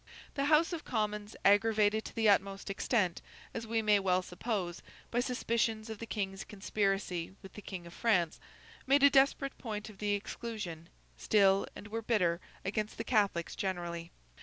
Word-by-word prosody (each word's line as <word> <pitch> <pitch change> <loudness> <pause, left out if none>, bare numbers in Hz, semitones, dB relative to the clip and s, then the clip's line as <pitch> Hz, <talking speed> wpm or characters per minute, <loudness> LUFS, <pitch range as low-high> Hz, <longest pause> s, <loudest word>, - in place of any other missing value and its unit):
The 275 - 0
House 315 +4 +4
of 330 - -4
Commons, 210 -2 -2
aggravated 210 +1 +4
to - - -8
the 225 -1 +2
utmost 195 -1 +2
extent, 195 -3 0 0.3
as 230 0 -5
we 225 0 0
may 210 -1 +5
well 185 -1 +2
suppose, 180 -2 -3 0.3
by 240 - +1
suspicions 230 -3 0
of 220 - -7
the 230 - -6
King's 195 -3 -3
conspiracy 195 -3 -1
with 190 - -11
the 210 - -9
King 185 -4 -7
of 170 - -11
France, 180 -8 +1 0.5
made 275 +1 +5
a 285 - +8
desperate 275 0 +3
point 215 -2 -5
of 195 - -18
the 205 -1 0
exclusion, 200 -5 -5 0.3
still, 195 -2 +4
and 210 - -9
were 225 +2 -3
bitter 185 -7 +1 0.2
against 210 +2 -2
the 230 - -2
Catholics 200 -7 +1
generally. 175 -3 -3
210 Hz, 165 wpm, -32 LUFS, 190-225 Hz, 0.5 s, a